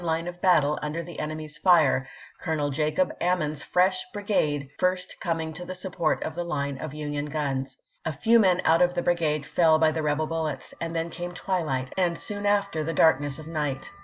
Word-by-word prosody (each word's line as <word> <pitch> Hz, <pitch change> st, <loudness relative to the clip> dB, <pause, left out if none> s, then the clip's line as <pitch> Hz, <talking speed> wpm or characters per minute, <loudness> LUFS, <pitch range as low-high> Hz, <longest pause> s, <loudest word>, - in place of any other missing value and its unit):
line 165 Hz, 0 st, 0 dB
of 175 Hz, 0 st, -7 dB
battle 150 Hz, -5 st, +4 dB
under 150 Hz, +3 st, -3 dB
the 170 Hz, 0 st, -9 dB
enemy's 155 Hz, 0 st, -5 dB
fire, 155 Hz, -8 st, +4 dB, 0.3 s
Colonel 150 Hz, -3 st, -1 dB
Jacob 155 Hz, +5 st, +1 dB
Ammen's 155 Hz, -5 st, 0 dB
fresh 185 Hz, +3 st, +2 dB
brigade 175 Hz, -, 0 dB
first 180 Hz, 0 st, 0 dB
coming 165 Hz, -2 st, -2 dB
to 180 Hz, +3 st, -7 dB
the 185 Hz, +1 st, -6 dB
support 180 Hz, -3 st, -1 dB
of 160 Hz, -, -4 dB
the 175 Hz, +2 st, -3 dB
line 140 Hz, -5 st, -3 dB
of 150 Hz, +1 st, -6 dB
Union 145 Hz, -1 st, -3 dB
guns. 140 Hz, -3 st, -3 dB, 0.3 s
A 160 Hz, -, -1 dB
few 225 Hz, +10 st, +4 dB
men 185 Hz, -4 st, +3 dB
out 165 Hz, +2 st, +5 dB
of 180 Hz, 0 st, +3 dB
the 175 Hz, -, 0 dB
brigade 155 Hz, -4 st, +1 dB
fell 160 Hz, +1 st, +4 dB
by 155 Hz, 0 st, +4 dB
the 160 Hz, -, -2 dB
rebel 150 Hz, +1 st, 0 dB
bullets, 155 Hz, -4 st, -3 dB
and 165 Hz, 0 st, -3 dB
then 165 Hz, +1 st, -2 dB
came 175 Hz, +1 st, -5 dB
twilight, 155 Hz, -9 st, -2 dB
and 175 Hz, -3 st, +1 dB
soon 205 Hz, 0 st, -4 dB
after 200 Hz, -6 st, +1 dB
the 165 Hz, +2 st, -2 dB
darkness 145 Hz, -3 st, +3 dB
of 155 Hz, -, -9 dB
night. 150 Hz, -4 st, -3 dB
160 Hz, 195 wpm, -26 LUFS, 150-180 Hz, 0.3 s, out